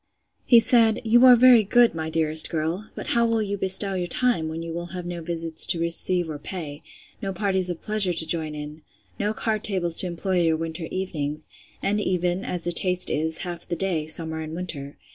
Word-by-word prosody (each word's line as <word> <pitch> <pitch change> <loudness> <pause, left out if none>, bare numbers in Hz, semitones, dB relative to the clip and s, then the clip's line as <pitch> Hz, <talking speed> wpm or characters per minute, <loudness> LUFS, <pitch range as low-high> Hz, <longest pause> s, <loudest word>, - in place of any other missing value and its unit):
He 235 - +7
said, 225 -2 +4
You 240 +2 +3
are 250 - +8
very 245 -2 +6
good, 240 +3 +3
my 160 -1 -5
dearest 160 -1 +2
girl! 165 +6 -4
But - - -6
how 235 - +2
will 225 -1 0
you 200 -1 -3
bestow 190 +1 +2
your 180 -2 -3
time, 230 -4 -1
when 165 +1 -6
you 165 -1 -7
will 170 +1 -6
have 180 - -7
no 175 -1 -6
visits 165 -1 -2
to 170 - +1
receive 170 +1 +3
or 155 -2 -7
pay? 150 -3 -8 0.4
No 195 - -4
parties 190 -1 0
of 175 -2 -6
pleasure 210 -3 +2
to 165 -1 +1
join 160 -2 -2
in? 150 +1 -9 0.4
No 210 +1 -1
card 215 -2 -3
tables 175 -5 0
to 185 - +4
employ 180 +1 -2
your 165 -1 +1
winter 165 +1 -6
evenings; 155 -5 -5 0.4
and 210 +1 0
even, 180 -1 -2
as 175 -2 -5
the 175 - -2
taste 180 +1 +3
is, 160 +2 -1
half 175 -1 -8
the 175 - -3
day, 165 -4 -3
summer 160 0 +3
and 155 0 -7
winter? 150 -6 -6
175 Hz, 210 wpm, -23 LUFS, 160-195 Hz, 0.4 s, are